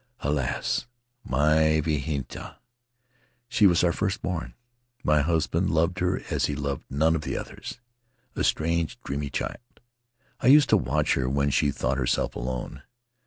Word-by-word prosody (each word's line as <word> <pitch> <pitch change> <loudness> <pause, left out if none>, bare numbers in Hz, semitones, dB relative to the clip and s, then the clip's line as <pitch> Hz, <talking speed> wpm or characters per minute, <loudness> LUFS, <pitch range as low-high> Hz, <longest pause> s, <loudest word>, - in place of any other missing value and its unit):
Alas, 70 - -1 0.4
my 80 +4 +3
Vahinetua! 75 -2 -3 0.9
She 105 -3 +4
was 90 -2 +3
our 85 - +4
first 95 +3 -2
born; 90 -3 -3 0.5
my 75 -1 +3
husband 80 +1 +1
loved 85 +3 +1
her 90 +1 0
as - - +1
he 75 - -2
loved 70 -1 -3
none 80 +4 +2
of 80 - -1
the - - -3
others. - - -7 0.6
A - - -1
strange, 85 0 0
dreamy 70 +1 -3
child.... 120 - -6 0.6
I - - 0
used 145 +1 +7
to - - +6
watch - - +1
her 65 -1 0
when 70 +1 +1
she 70 - +2
thought 65 -1 -1
herself - - 0
alone. 65 0 -4
75 Hz, 150 wpm, -26 LUFS, 70-85 Hz, 0.9 s, used